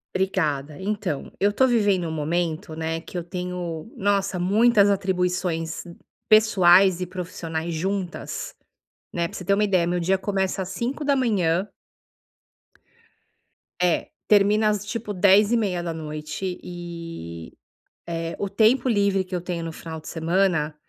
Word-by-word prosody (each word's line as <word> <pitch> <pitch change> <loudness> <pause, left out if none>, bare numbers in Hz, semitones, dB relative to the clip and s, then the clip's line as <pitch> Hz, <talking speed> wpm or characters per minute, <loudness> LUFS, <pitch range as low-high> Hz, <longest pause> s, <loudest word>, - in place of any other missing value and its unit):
Obrigada. 155 -6 -1
Então, 195 -6 -3
eu 200 - +4
estou 260 +6 +3
vivendo 205 -7 +2
um - - -4
momento, 160 +1 -2
né, 160 0 -3
que 180 - -8
eu 175 - -3
tenho, 180 +1 -5
nossa, 200 -1 +1
muitas 205 +3 +4
atribuições 180 -4 -1 0.5
pessoais 190 -4 +6
e 180 - -2
profissionais 170 -2 -4
juntas, 185 +2 -3 0.6
né. 170 -1 0
Pra - - -9
você 180 - -8
ter 200 - +3
uma 205 +2 +2
ideia 185 -4 +2
meu 175 +1 0
dia 190 +3 +2
começa 190 -1 -1
às 180 - -8
05:00 230 - 0 2.1
É, 180 -2 +1 0.2
termina 210 +1 +4
as, 210 -1 -1
tipo, 210 -1 -4
22:30 180 -5 +1
e, 165 - -8 0.5
eh, 165 0 -4
o 200 - -2
tempo 220 +6 +3
livre 200 -4 +2
que 185 - -8
eu 180 - -1
tenho 170 -1 -4
no 165 - -5
final 160 0 -8
de 155 - -11
semana, 165 -2 +1
180 Hz, 130 wpm, -24 LUFS, 165-200 Hz, 2.1 s, pessoais